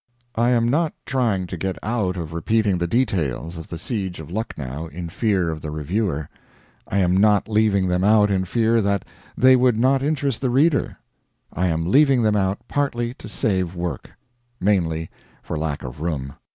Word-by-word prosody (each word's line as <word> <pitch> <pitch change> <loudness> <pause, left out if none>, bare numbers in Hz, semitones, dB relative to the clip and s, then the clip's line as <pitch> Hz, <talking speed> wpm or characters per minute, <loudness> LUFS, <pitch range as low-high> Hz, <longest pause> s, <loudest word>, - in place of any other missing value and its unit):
I 120 +2 +2
am 120 -2 +3
not 155 +5 +1
trying 115 -9 0
to 90 - -6
get 95 0 -3
out 105 -4 -1
of 80 -2 -5
repeating 100 +3 +1
the 85 - 0
details 85 - -1
of 80 -1 -8
the 85 - -5
Siege 95 -5 -4
of 80 0 -9
Lucknow 80 - -4
in 85 +2 -7
fear 95 -3 0
of 80 -1 -6
the 80 - -5
reviewer; 80 +1 -2 0.6
I 100 - -2
am 90 -2 +3
not 105 +1 +4
leaving 105 -3 +2
them 90 +1 +1
out 105 0 +4
in 95 -1 +1
fear 115 +3 +2
that 100 -2 0 0.3
they 130 +1 +6
would 125 -3 +3
not 130 +3 +3
interest 140 -4 -1
the 130 - +1
reader; 140 +4 +2 0.6
I 90 +3 0
am 80 -1 0
leaving 135 - +4
them 105 -1 +3
out 95 0 -1
partly 120 -4 -1
to 110 - -11
save 95 -6 -1
work; 85 -1 -4 0.5
mainly 80 -5 0 0.3
for - - -5
lack 75 -1 -3
of 65 +2 -8
room. 70 -5 -3
100 Hz, 180 wpm, -22 LUFS, 85-115 Hz, 0.6 s, they